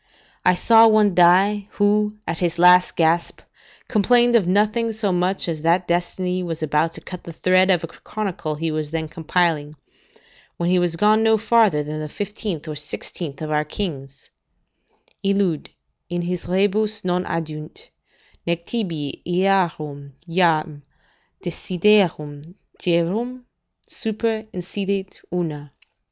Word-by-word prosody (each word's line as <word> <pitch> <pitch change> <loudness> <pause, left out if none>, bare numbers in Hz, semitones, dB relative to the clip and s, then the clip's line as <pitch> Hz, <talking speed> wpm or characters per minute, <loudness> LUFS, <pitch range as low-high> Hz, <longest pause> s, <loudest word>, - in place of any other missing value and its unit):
I 180 - +4
saw 225 +4 +6
one 215 -3 +4
die, 190 +4 +4
who, 210 +1 +1
at 165 0 -3
his 175 -2 -1
last 180 +1 +5
gasp, 170 +1 +1 0.5
complained 240 +2 +3
of 205 -7 +3
nothing 215 +4 +1
so 215 -2 -1
much 180 +2 0
as 160 -3 -3
that 170 +3 +2
destiny 180 +1 -1
was 165 -3 -4
about 155 +2 +1
to - - -9
cut 180 -1 -9
the 170 - -8
thread 185 +3 +3
of 180 -3 +3
a - - -3
chronicle 175 -4 -5
he 160 +1 -2
was 155 -1 -3
then 160 0 -3
compiling, 160 -2 -1 0.8
when 170 +1 0
he 180 - +4
was 175 -2 0
gone 210 +5 +3
no 220 0 +4
farther 220 -8 +3
than 150 +1 -5
the 155 0 -5
fifteenth 200 -4 -5
or 155 - -5
sixteenth 150 +1 -6
of 155 - -4
our 150 0 +1
kings: 140 -5 -6 0.9
"Illud 195 -5 0 0.4
in 175 0 -2
his 175 0 -4
rebus 205 +3 +1
non 180 0 0
addunt: 155 -2 -6 0.6
nec 170 0 -1
tibi 165 - -3
earum 170 -6 0
jam 165 -4 +1 0.6
desiderium 175 -4 +1 0.3
rerum 210 +10 0 0.4
super 220 0 -2
insidet 195 +2 -4
una." 150 -5 -4
180 Hz, 135 wpm, -21 LUFS, 160-205 Hz, 0.9 s, saw